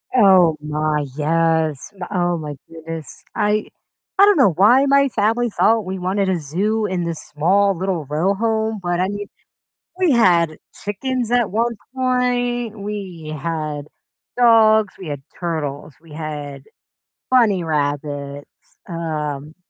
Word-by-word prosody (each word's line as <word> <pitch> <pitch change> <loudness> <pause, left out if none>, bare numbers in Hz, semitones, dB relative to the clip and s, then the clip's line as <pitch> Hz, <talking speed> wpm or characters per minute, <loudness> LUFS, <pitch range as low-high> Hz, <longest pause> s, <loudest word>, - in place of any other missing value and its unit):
Oh 185 -7 +6
my, 150 0 -1
yes, 160 -1 +1
m 185 -3 -7
oh 175 -3 0
my 150 -2 -6
goodness. 165 -1 -8
I 210 +1 +1 0.5
I 400 - +9
don't 410 -4 +4
know 205 -9 +6
why 240 - +5
my 280 0 +4
family 230 +3 +1
thought 225 0 +2
we 190 +1 -4
wanted 190 +2 0
a 180 - 0
zoo 200 +9 -1
in 185 -3 -2
this 170 -2 -3
small 195 +5 +3
little 180 -4 -2
row 155 +8 0
home, 220 0 -1
but 175 -1 -1
I 185 - +1
mean, 205 0 -5 0.7
we 365 -4 +3
had 170 - +3 0.3
chickens 240 +3 -2
at 240 -4 +2
one 235 +2 0 0.2
point, 245 -3 0
we 190 -7 -6
had 150 -1 -4 0.5
dogs, 220 -4 +5
we 185 - -8
had 145 -2 -5 0.2
turtles, 150 -4 -4
we 165 -3 -15
had 145 -3 -6 0.7
bunny 215 -8 +4
rabbits, 145 -2 -3 0.4
um, 155 -3 -4
180 Hz, 135 wpm, -20 LUFS, 155-220 Hz, 0.7 s, I